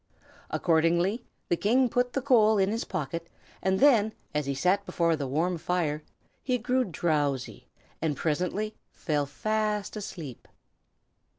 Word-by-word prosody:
Accordingly 170 +6 +2 0.2
the 175 - +2
King 245 +8 +3
put 245 +1 0
the 275 - -1
coal 220 -5 +5
in 195 0 +2
his 225 +1 -2
pocket, 170 -1 -4 0.3
and 190 0 +1
then, 225 -6 +5 0.2
as 150 -2 -1
he 140 - -1
sat 180 +8 +2
before 170 -4 +1
the 145 -3 -3
warm 165 +6 0
fire, 160 -3 -1 0.4
he 255 -1 0
grew 250 +2 +1
drowsy, 145 -7 -1 0.3
and 155 -3 0
presently 180 +7 -1 0.2
fell 150 -4 -1
fast 215 +6 -1
asleep. 165 - -7
180 Hz, 135 wpm, -28 LUFS, 155-215 Hz, 0.4 s, coal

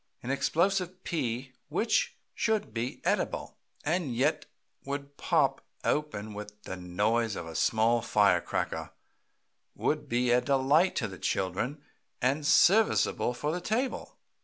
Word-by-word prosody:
An 125 - -2
explosive 185 +5 0
pea 130 -5 -2 0.2
which 240 - +1 0.2
should 215 - 0
be 120 +2 -3
edible, - - -1 0.3
and 155 -5 0
yet 145 +4 +1 0.4
would 140 0 -5
pop - - +1 0.2
open 110 -9 -1
with 105 0 -9
the 95 - -5
noise 105 +5 0
of 85 - -5
a 80 - -8
small 115 +6 +2
fire 100 -6 +3
cracker, - - -3 0.9
would 150 -2 -1
be 120 +1 +2
a 125 +1 +5
delight 140 +7 +3
to 115 - 0
the 95 -3 -10
children 115 +10 -2 0.4
and 140 +4 +1
serviceable 195 - +4
for 150 +4 -2
the 175 +2 -3
table. 245 +7 -2
135 Hz, 135 wpm, -29 LUFS, 110-160 Hz, 0.9 s, a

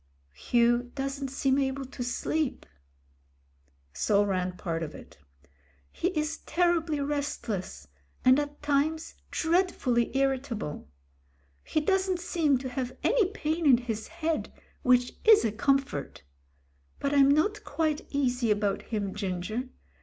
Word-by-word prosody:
"... 70 - -39 0.2
Hugh 240 0 +3
doesn't 275 0 -3
seem 270 0 +1
able 270 0 -1
to 260 -1 -6
sleep." 285 +4 -2 1.3
So 205 -1 +2
ran 185 -2 -1
part 165 -2 -3
of 155 -2 -5
it. - - -13 0.7
"He 350 - -1
is 310 +1 -2
terribly 335 -2 +1
restless, 280 -9 -3 0.4
and 255 +2 +7
at 290 0 -5
times 295 +2 0 0.2
dread 360 +3 +2
fully 240 -2 0
irritable. 260 - -2 0.7
He 310 - 0
doesn't 380 +1 +1
seem 320 -5 +1
to 260 +1 -5
have 255 0 -4
any 470 -6 +3
pain 325 -5 -1
in 255 -3 +7
his 225 -3 -4
head, 325 -1 -2 0.3
which 250 -1 +3
is 435 - +7
a 220 - +1
comfort. 270 - -1 0.8
But 280 0 -1
I'm 280 -1 +6
not 410 +9 +2
quite 310 -3 -1
easy 250 -4 0
about 205 -2 +1
him, 205 -4 -3
Ginger. 205 +5 -3
270 Hz, 130 wpm, -28 LUFS, 235-310 Hz, 1.3 s, and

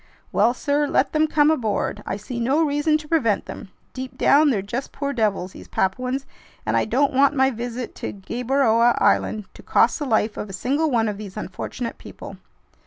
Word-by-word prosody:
"Well, 230 +5 +3
sir, 290 +2 0
let 275 - +1
them 310 0 +3
come 300 0 +4
aboard. 215 -6 -1
I - - -2
see 235 +4 -6
no 270 +7 +2
reason 295 +1 +2
to 305 -1 -11
prevent 235 -11 +1
them. - - -9 0.2
Deep 255 -1 -7
down 295 +3 +5
they're 210 -8 0
just 235 +7 -4
poor 280 0 -3
devils, 205 -6 0
these - - -12
Papuans, 255 +8 -1 0.4
and - - 0
I - - +2
don't 270 +6 +1
want 275 +2 +4
my 265 0 +3
visit 240 +1 -5
to - - -4
Gueboroa 235 +3 +1
Island 215 -2 +2
to - - -13
cost - - +2
the 295 - -2
life 220 -3 +1
of 210 - -5
a - - -8
single 280 +11 0
one 230 -4 +2
of 210 -1 -3
these 205 -1 -8
unfortunate 230 +4 -5
people!" - - -10
250 Hz, 195 wpm, -23 LUFS, 215-285 Hz, 0.4 s, down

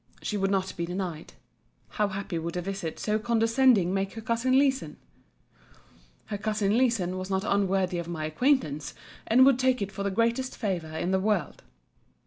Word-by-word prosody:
She 210 - -2
would 195 -1 0
not 190 -1 -1
be 170 0 -3
denied. 175 -3 -5 0.6
How 210 -2 0
happy 195 -3 -4
would 170 +2 -4
a - - -1
visit 195 -4 -4
so 215 0 0
condescending 230 -3 +3
make 195 0 -1
her 225 - -7
cousin 235 +4 +1
Leeson!——Her 265 -5 -5
cousin 210 -1 0
Leeson 220 -8 +1
was 185 +1 -6
not 190 0 0
unworthy 195 -3 +1
of 170 - -5
my 160 -3 -4
acquaintance: 155 - 0 0.3
and 255 +3 +6
would 270 -2 +4
take 260 -1 +2
it 200 -1 -3
for 200 0 -6
the 200 - 0
greatest 235 +5 0
favour 170 -8 -3
in 175 +3 -1
the 190 - +2
world. 195 -6 -1
200 Hz, 170 wpm, -27 LUFS, 180-230 Hz, 0.6 s, and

